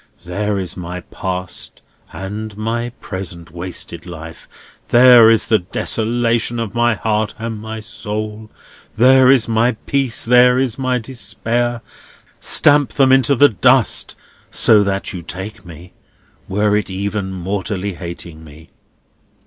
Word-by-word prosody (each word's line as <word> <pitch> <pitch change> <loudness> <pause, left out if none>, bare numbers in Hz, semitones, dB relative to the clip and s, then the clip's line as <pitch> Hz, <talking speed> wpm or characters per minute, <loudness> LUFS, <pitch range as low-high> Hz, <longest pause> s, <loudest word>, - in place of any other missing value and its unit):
"There 100 +3 -2
is 95 -2 -5
my 90 0 -6
past 90 -1 -6 0.3
and 105 +2 -6
my 115 +2 -2
present 85 -3 -7
wasted 85 -1 -8
life. 80 -1 -10 0.4
There 120 -2 +8
is 115 -1 +3
the 110 - +3
desolation 115 +5 -1
of 110 -3 -4
my 120 -1 +2
heart 110 0 -1
and 115 -1 -5
my 110 0 -7
soul. 110 0 -6 0.5
There 130 +2 +6
is 130 -4 +4
my 115 +2 +2
peace; 135 -4 0
there 125 +1 +5
is 130 -2 -1
my 130 -1 0
despair. 120 -1 -3 0.6
Stamp 145 -1 +3
them 135 -2 +3
into 135 +1 +4
the 145 +3 +6
dust; 125 +2 +2 0.3
so 110 -2 +4
that 100 0 -2
you 90 - -6
take 95 +3 -8
me, 85 +2 -12 0.6
were 105 +2 +1
it 105 -1 -1
even 100 +1 -3
mortally 95 +1 -3
hating 85 -2 -9
me!" 80 +1 -15
110 Hz, 135 wpm, -18 LUFS, 95-120 Hz, 0.6 s, There